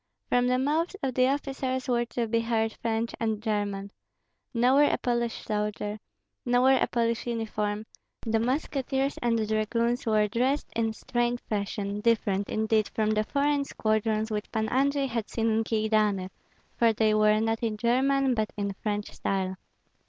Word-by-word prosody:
From 245 Hz, 0 st, +3 dB
the 250 Hz, 0 st, +2 dB
mouths 310 Hz, +8 st, 0 dB
of 265 Hz, -1 st, 0 dB
the 255 Hz, +1 st, +3 dB
officers 270 Hz, -2 st, -2 dB
were 240 Hz, -1 st, +1 dB
to 240 Hz, 0 st, -2 dB
be 230 Hz, +1 st, +1 dB
heard 225 Hz, -1 st, 0 dB
French 230 Hz, 0 st, -1 dB
and 220 Hz, -2 st, -1 dB
German. 205 Hz, -2 st, -2 dB, 0.6 s
Nowhere 260 Hz, +4 st, +4 dB
a -, -, +1 dB
Polish 235 Hz, -1 st, -2 dB
soldier, 210 Hz, 0 st, -2 dB, 0.4 s
nowhere 250 Hz, +1 st, +4 dB
a -, -, +3 dB
Polish 235 Hz, 0 st, -1 dB
uniform; 215 Hz, -2 st, -2 dB, 0.4 s
the 225 Hz, 0 st, +1 dB
musketeers 270 Hz, +2 st, -1 dB
and 230 Hz, -2 st, +1 dB
dragoons 230 Hz, +3 st, 0 dB
were 215 Hz, -1 st, +3 dB
dressed 255 Hz, +7 st, 0 dB
in 225 Hz, -1 st, 0 dB
strange 240 Hz, +2 st, -1 dB
fashion, 200 Hz, -1 st, -3 dB
different, 205 Hz, -3 st, +1 dB
indeed, 220 Hz, -1 st, +1 dB
from 215 Hz, -1 st, 0 dB
the 215 Hz, 0 st, +2 dB
foreign 285 Hz, +2 st, +1 dB
squadrons 220 Hz, -3 st, 0 dB
which 210 Hz, 0 st, -3 dB
Pan 220 Hz, -1 st, -1 dB
Andrei 275 Hz, +2 st, +2 dB
had 230 Hz, -4 st, -3 dB
seen 225 Hz, -1 st, 0 dB
in 220 Hz, +1 st, +2 dB
Kyedani, 215 Hz, -4 st, +1 dB, 0.5 s
for 230 Hz, -1 st, +4 dB
they 215 Hz, 0 st, +2 dB
were 215 Hz, 0 st, +4 dB
not 225 Hz, 0 st, 0 dB
in 220 Hz, -2 st, -1 dB
German 265 Hz, +3 st, +2 dB
but 220 Hz, -2 st, -1 dB
in 200 Hz, -1 st, -2 dB
French 210 Hz, -1 st, -2 dB
style. 190 Hz, -1 st, -2 dB
225 Hz, 160 wpm, -27 LUFS, 215-250 Hz, 0.6 s, Nowhere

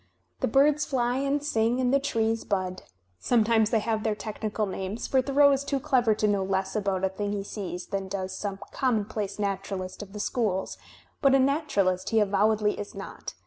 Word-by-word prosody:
The -, -, +1 dB
birds 290 Hz, +5 st, +4 dB
fly 245 Hz, -3 st, 0 dB
and 280 Hz, +1 st, 0 dB
sing 235 Hz, -4 st, +1 dB
and 255 Hz, 0 st, +1 dB
the 275 Hz, -, +5 dB
trees 225 Hz, -5 st, 0 dB
bud. 185 Hz, -2 st, -2 dB, 0.4 s
Sometimes 225 Hz, -2 st, +3 dB
they 230 Hz, -, +2 dB
have 220 Hz, 0 st, -1 dB
their 215 Hz, -1 st, 0 dB
technical 215 Hz, 0 st, -3 dB
names, 195 Hz, +3 st, -4 dB
for 265 Hz, -, +2 dB
Thoreau 280 Hz, +2 st, +5 dB
is 275 Hz, 0 st, +1 dB
too 280 Hz, -1 st, -1 dB
clever 250 Hz, -6 st, +2 dB
to 215 Hz, -, +1 dB
know 200 Hz, -2 st, +1 dB
less 190 Hz, +1 st, -1 dB
about 195 Hz, -3 st, -1 dB
a 190 Hz, -, +3 dB
thing 205 Hz, +2 st, -3 dB
he 200 Hz, -1 st, -2 dB
sees 190 Hz, -3 st, -5 dB
than 195 Hz, -1 st, -3 dB
does 190 Hz, -1 st, -4 dB
^sorne 200 Hz, -1 st, -4 dB, 0.2 s
conunonplaoe 215 Hz, -5 st, -1 dB
naturalist 195 Hz, -2 st, -3 dB
of 200 Hz, -1 st, -10 dB
the 210 Hz, -, -6 dB
schools; 205 Hz, -4 st, -1 dB, 0.4 s
but 275 Hz, -1 st, +5 dB
a -, -, +5 dB
naturalist 260 Hz, -, +1 dB
he 225 Hz, -, +3 dB
avowedly 210 Hz, +1 st, +2 dB
is 205 Hz, 0 st, -7 dB
not. 195 Hz, -, -8 dB
215 Hz, 190 wpm, -27 LUFS, 195-255 Hz, 0.4 s, the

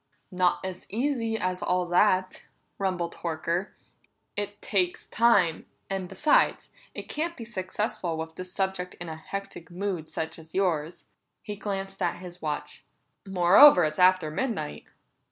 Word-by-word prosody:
"Not 180 Hz, 0 st, +1 dB
as 185 Hz, -1 st, -6 dB
easy 230 Hz, -1 st, -1 dB
as 185 Hz, -3 st, -2 dB
all 180 Hz, 0 st, +1 dB
that!" 185 Hz, 0 st, +2 dB, 0.3 s
rumbled 185 Hz, -3 st, -2 dB
Horker. 170 Hz, +3 st, -2 dB, 0.6 s
"It 205 Hz, 0 st, -4 dB
takes 185 Hz, -4 st, 0 dB
time; 220 Hz, -8 st, +3 dB, 0.2 s
and 190 Hz, -2 st, -3 dB
besides, 300 Hz, 0 st, +2 dB, 0.2 s
it -, -, -6 dB
can't 335 Hz, +3 st, -2 dB
be 230 Hz, -, -7 dB
successful 185 Hz, -4 st, -3 dB
with 160 Hz, 0 st, -5 dB
the 185 Hz, -, -6 dB
subject 185 Hz, 0 st, -3 dB
in 175 Hz, -1 st, -7 dB
a 160 Hz, -, -5 dB
hectic 170 Hz, +1 st, -7 dB
mood 180 Hz, -3 st, -3 dB
such 160 Hz, +1 st, -4 dB
as 160 Hz, 0 st, -14 dB
yours." 170 Hz, -4 st, 0 dB, 0.4 s
He 210 Hz, -2 st, -5 dB
glanced 195 Hz, -1 st, -5 dB
at -, -, +1 dB
his 180 Hz, 0 st, -10 dB
watch. 150 Hz, -2 st, -4 dB, 0.4 s
"Moreover, 185 Hz, +5 st, +7 dB
it's 155 Hz, +1 st, -1 dB
after 180 Hz, -4 st, +4 dB
midnight." 200 Hz, -, -3 dB
185 Hz, 140 wpm, -27 LUFS, 170-200 Hz, 0.6 s, Moreover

